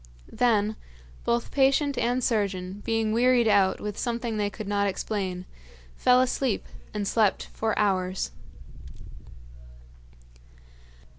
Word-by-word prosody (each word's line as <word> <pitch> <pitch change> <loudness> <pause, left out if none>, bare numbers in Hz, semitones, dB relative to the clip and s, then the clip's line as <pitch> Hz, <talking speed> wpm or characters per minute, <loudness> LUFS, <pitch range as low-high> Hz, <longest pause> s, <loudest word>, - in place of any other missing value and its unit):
Then, 215 -3 +2 0.5
both 235 0 0
patient 275 +1 +3
and 245 +1 0
surgeon, 200 -4 -1
being 225 -1 0
wearied 245 0 +4
out 195 -3 +3
with 210 -1 -5
something 235 -2 -2
they 205 -1 0
could 210 0 -8
not 200 0 +1
explain, 190 -2 -3 0.5
fell 250 0 +4
asleep 255 -2 0 0.3
and 205 -2 -3
slept 215 -3 +1
for 220 -1 -1
hours. 185 -2 0
215 Hz, 105 wpm, -26 LUFS, 200-240 Hz, 0.5 s, wearied